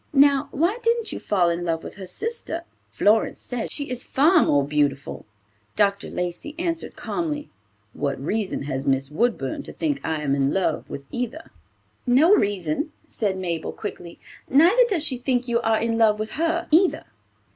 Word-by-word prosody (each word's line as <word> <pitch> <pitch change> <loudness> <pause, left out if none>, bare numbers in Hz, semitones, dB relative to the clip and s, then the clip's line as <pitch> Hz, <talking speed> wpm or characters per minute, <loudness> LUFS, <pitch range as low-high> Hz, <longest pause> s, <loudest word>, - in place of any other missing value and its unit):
Now, 280 -1 +5
why 345 - 0
didn't 465 0 +1
you - - -4
fall 180 -4 +2
in 170 +1 -2
love 165 -1 -1
with - - -8
her 190 -2 -7
sister? 445 - -3 0.3
Florence 215 +2 +2
says 245 -3 -4
she 285 -1 -3
is 250 -1 -2
far 315 +5 +4
more 145 -1 +3
beautiful." 145 -4 -1 0.5
Dr. 200 -1 +1
Lacey 180 - -4
answered 335 -1 -3
calmly, 300 -3 -3 0.4
"What 140 -2 -2
reason 195 +4 -2
has 135 0 -4
Miss 135 +1 +1
Woodburn 245 - 0
to - - -9
think 295 -3 -1
I 155 -1 -2
am 140 -2 +1
in 140 0 +2
love 190 - -1
with 140 - -7
either." 250 +6 -4 0.6
"No 285 +10 +6
reason," 200 - 0 0.2
said 200 -4 -1
Mabel, 170 -3 -3
quickly; 175 -5 -7 0.3
"neither 355 - +6
does 335 -7 0
she 260 -5 0
think 250 0 0
you 235 0 +1
are 225 -1 +2
in 230 0 0
love 215 -2 +4
with 215 +1 -4
her 335 +2 0
either." 350 +4 +4
230 Hz, 170 wpm, -24 LUFS, -, 0.6 s, No